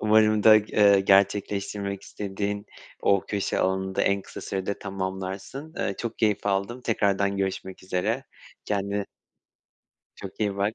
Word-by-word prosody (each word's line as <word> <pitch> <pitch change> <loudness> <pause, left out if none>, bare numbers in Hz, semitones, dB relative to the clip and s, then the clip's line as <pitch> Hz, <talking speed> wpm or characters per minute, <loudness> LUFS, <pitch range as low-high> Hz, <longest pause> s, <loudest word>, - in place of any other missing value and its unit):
Umarım 110 0 +4
da, 110 - +8 0.2
ııı, 100 -2 +6
gerçekleştirmek 100 0 +1
istediğin 100 +1 -4 0.4
o 100 -1 +4
köşe 100 -2 -1
alanını 95 0 0
da - - +1
en 100 0 +2
kısa - - -9
sürede 95 +1 -3
tamamlarsın. 95 - -5
Eee, 100 - -1
çok 115 -1 -4
keyif 105 -2 +1
aldım 100 +5 -1
tekrardan 100 -4 +1
görüşmek 95 -1 -3
üzere 100 +8 -1 0.4
kendine 100 0 -1 1.1
çok 95 +2 -10
iyi 100 -2 0
bak, 100 +2 0
100 Hz, 135 wpm, -26 LUFS, 95-105 Hz, 1.1 s, da